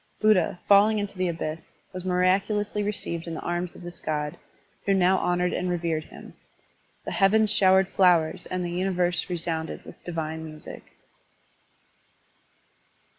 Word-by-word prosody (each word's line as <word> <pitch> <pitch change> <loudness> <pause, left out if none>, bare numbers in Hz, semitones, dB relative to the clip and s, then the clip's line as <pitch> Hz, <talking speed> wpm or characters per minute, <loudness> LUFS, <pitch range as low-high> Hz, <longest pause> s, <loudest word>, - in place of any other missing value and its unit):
Buddha, 195 -5 +3
falling 205 +2 +6
into 205 -1 -3
the 185 0 0
abyss, 165 -1 -5 0.2
was 185 -1 -6
miraculously 195 +3 +1
received 175 -5 -3
in 165 - -4
the - - -5
arms 175 0 -3
of - - -12
this 175 0 -9
god, 150 -1 -2 0.5
who 195 - +4
now 190 0 +4
honored 180 0 0
and 180 - -1
revered 165 -3 -1
him. - - -13 0.7
The - - -4
heavens 210 +1 +3
showered 190 -2 +5
flowers 175 -5 +2
and 185 -1 -2
the 175 - -3
universe 180 -1 0
resounded 165 -2 -3
with - - -13
divine 160 -2 -4
music. 155 -1 -9
180 Hz, 140 wpm, -26 LUFS, 165-195 Hz, 0.7 s, falling